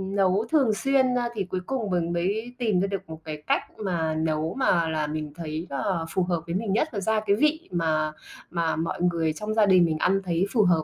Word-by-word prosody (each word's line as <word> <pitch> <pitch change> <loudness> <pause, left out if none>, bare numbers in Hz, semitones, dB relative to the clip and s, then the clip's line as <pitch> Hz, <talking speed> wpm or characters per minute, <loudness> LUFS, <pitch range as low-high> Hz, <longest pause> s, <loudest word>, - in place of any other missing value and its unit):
nấu 195 +2 +2
thường 275 -8 +4
xuyên, 260 +2 +2
a, 240 -1 0
thì 200 -3 -1
cuối 185 0 -4
cùng 240 -6 -2
mình 170 -1 0
mới 210 +8 -1
tìm 220 -7 +1
ra 195 - +1
được 195 -4 -5
một 160 - -7
cái 150 -1 -7
cách - - +3 0.2
mà 170 -6 -1
nấu 160 0 -1
mà 170 -10 +3
là 155 -1 -1
mình 150 -1 -4
thấy 160 0 -5
là 165 +4 -1
phù 185 - 0
hợp 175 -2 -1
với 170 - -2
mình 200 -1 -1
nhất 310 +9 +2
nó 200 - -2
ra 220 +2 +1
cái 200 -1 +4
vị 305 +7 +1
mà 155 -3 +1 0.4
mà 165 -1 0
mọi 165 +1 -3
người 165 -3 +1
trong 210 +6 -4
gia 215 -2 +4
đình 185 -3 +6
mình 160 -2 0
ăn 190 +4 +2
thấy 175 0 +1
phù 220 - +5
hợp. 170 -4 +3
180 Hz, 240 wpm, -26 LUFS, 160-215 Hz, 0.4 s, đình